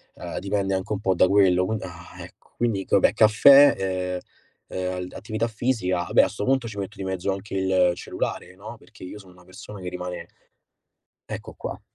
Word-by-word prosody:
ehm, - - -6
dipende 100 0 -1
anche 95 +1 -3
un 100 - -4
po' 95 -2 +2
da 95 - +4
quello 95 -2 +4
qui 110 +4 -1
ah, 85 -2 -10
ecco. - - -16
Quindi 110 -5 -1
vabbè - - +4
caffè, 135 +6 +7
ehm, 90 -1 -2 0.6
ehm, 90 0 -3
attività 110 +2 -3
fisica, 110 -5 -1
vabbè - - +4
a - - +2
sto 105 - -6
punto 130 0 +1
ci 105 -2 -7
metto 100 +3 -6
di 95 - -5
mezzo 95 0 -2
anche 95 +1 -6
il 95 -2 +2
cellulare, 90 +1 -5
no. 105 +4 -10
perché - - -16
io 95 +3 -8
sono 95 -2 -16
una 90 - -19
persona 100 +3 -11
che 90 - -5
rimane 90 -1 -6 1.0
Ecco - - -7
qua. - - -7
95 Hz, 190 wpm, -24 LUFS, 90-105 Hz, 1.0 s, caffè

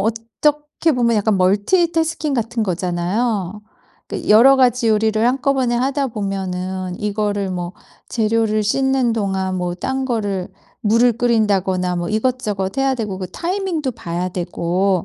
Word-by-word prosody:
어떻게 295 +9 0
보면 235 -3 +2
약간 210 -1 +2
멀티태스킹 320 - +1
같은 230 -1 -1
거잖아요. 185 +3 -1 0.5
그 - - -5
여러 245 +6 +7
가지 250 -2 +3
요리를 220 +1 +2
한꺼번에 260 -1 +1
하다 270 +3 0
보면은 190 -3 -3
이거를 205 -1 -1
뭐 175 -1 -4 0.4
재료를 220 -1 +1
씻는 265 +2 +1
동안 190 -3 -1
뭐 175 -1 -2
딴 265 +8 -2
거를 205 -7 -2 0.3
물을 230 +3 +3
끓인다거나 195 -6 +1
뭐 175 0 -2
이것저것 215 -4 -1
해야 270 0 +2
되고 210 -6 -4
그 185 - -5
타이밍도 345 -6 -2
봐야 180 -5 -4
되고 180 +1 -1
215 Hz, 300 characters per minute, -19 LUFS, 190-250 Hz, 0.5 s, 여러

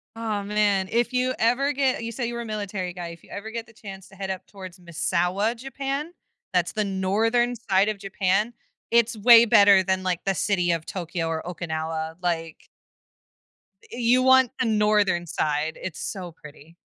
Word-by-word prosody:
Oh 215 -3 -3
man, 205 -2 +1
if 240 +1 +1
you 255 0 0
ever 245 +5 +2
get 265 -4 0
you 230 - -4
say 240 0 -3
you 240 - -5
were 235 - -4
a - - -6
military 205 -4 -4
guy, 175 -1 -6
if 170 -1 -11
you - - -19
ever 210 +2 -6
get 230 0 -5
the 230 - -19
chance 195 -4 -10
to 195 - -17
head 190 0 -5
up 190 -1 -5
towards 185 -2 -11
Misawa, 180 +5 -1
Japan, 275 +5 -4 0.4
that's 175 -1 +1
the 215 -1 0
northern 220 +6 +1
side 205 -3 +1
of 215 - -3
Japan, 195 +3 0 0.4
it's 235 -1 +3
way 235 +2 +8
better 200 -3 +6
than, 190 0 -1
like, 180 -2 -1
the 195 -1 0
city 180 -3 +1
of 165 -1 -2
Tokyo 170 -2 -4
or 160 -1 -2
Okinawa, 160 -1 -4
like 165 -2 -3 1.2
Eh, 235 - -7
you 250 +2 +3
want 260 -1 +5
the 255 - +1
northern 210 -5 +2
side- 155 +1 -1
it's 185 -4 -6
so 180 -3 -5
pretty. 155 +1 -15
200 Hz, 185 wpm, -24 LUFS, 180-230 Hz, 1.2 s, way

